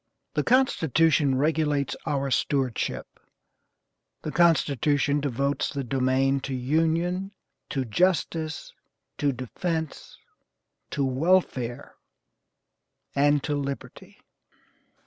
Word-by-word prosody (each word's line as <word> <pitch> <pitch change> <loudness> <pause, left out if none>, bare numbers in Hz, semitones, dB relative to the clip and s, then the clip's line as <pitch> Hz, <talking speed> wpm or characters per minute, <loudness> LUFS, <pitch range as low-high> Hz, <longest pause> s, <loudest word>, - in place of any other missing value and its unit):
The - - +1
Constitution 160 - +3
regulates 150 -1 +1
our 140 -1 -1
stewardship; 130 -3 0 1.2
the 155 - -3
Constitution 145 -4 +2
devotes 140 0 -1
the 140 -1 -3
domain 130 +2 +1
to 135 0 -4
union, 165 +8 0 0.4
to 135 -2 -2
justice, 160 - 0 0.5
to 145 -1 +2
defence, 160 +5 -4 0.7
to 140 - -1
welfare, 130 -4 0 1.2
and 145 0 +3
to 150 - -1
liberty." 140 -1 -6
145 Hz, 85 wpm, -26 LUFS, 135-160 Hz, 1.2 s, Constitution